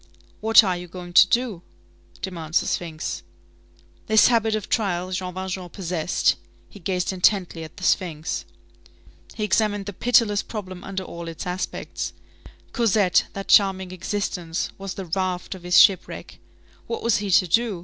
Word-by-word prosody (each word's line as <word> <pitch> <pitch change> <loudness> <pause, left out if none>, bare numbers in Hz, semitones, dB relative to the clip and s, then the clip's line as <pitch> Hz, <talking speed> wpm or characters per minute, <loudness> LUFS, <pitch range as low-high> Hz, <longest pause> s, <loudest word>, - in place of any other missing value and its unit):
What 225 +1 +7
are 185 -3 0
you 175 0 -7
going 175 0 -9
to 185 - +8
do? 235 -4 0 0.6
demands 165 -4 -1
the - - -4
sphinx. 160 -3 -3 0.9
This 220 +1 +6
habit 225 -2 +2
of 215 - -4
trial 185 -5 -1
Jean 185 0 -3
Valjean 185 0 -5
possessed. 175 -2 0 0.3
He 205 - -14
gazed 180 +1 -1
intently 180 -3 +1
at 155 - -11
the - - -10
sphinx. 165 -5 0 0.9
He 215 - -3
examined 205 -1 +1
the 205 - -6
pitiless 220 -1 +3
problem 185 -4 -7
under 190 -1 -4
all 170 -1 -8
its 165 -1 -6
aspects. 180 +1 -4 0.6
Cosette, 210 -6 +3
that 195 0 -6
charming 190 -2 +4
existence, 180 -3 -3
was 195 -1 -5
the 195 - -6
raft 180 +1 -2
of 190 - -11
this 180 0 +2
shipwreck. 195 -2 +3 0.5
What 460 - -4
was 235 -1 +3
he 205 -1 -3
to 185 0 +4
do? 220 +1 +1
190 Hz, 155 wpm, -23 LUFS, 180-205 Hz, 0.9 s, to